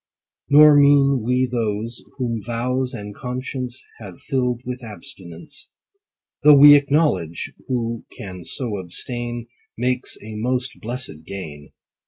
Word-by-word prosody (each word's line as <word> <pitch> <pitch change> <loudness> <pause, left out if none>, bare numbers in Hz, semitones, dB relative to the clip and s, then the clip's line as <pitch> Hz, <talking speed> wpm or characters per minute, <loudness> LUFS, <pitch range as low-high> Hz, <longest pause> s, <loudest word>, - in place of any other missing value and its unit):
Nor 150 +1 +8
mean 140 -2 +5
we 125 +2 +2
those, 115 -1 -3
whom 120 -4 -2
vows 125 +4 -2
and 105 -3 -7
conscience 125 +1 -5 0.2
Have 100 -5 -10
fill'd 125 -2 -1
with 125 0 -5
abstinence: 100 -7 -10 0.7
Though 150 -1 +8
we 145 +1 +10
acknowledge, 140 - +1
who 115 -2 -2
can 90 -3 -9
so 115 +2 -3
abstain, 120 +6 -5 0.3
Makes 125 +1 -1
a 110 +1 -8
most 125 +3 -2
blessed 115 -10 -6
gain. 75 -7 -8
120 Hz, 120 wpm, -21 LUFS, 105-130 Hz, 0.7 s, we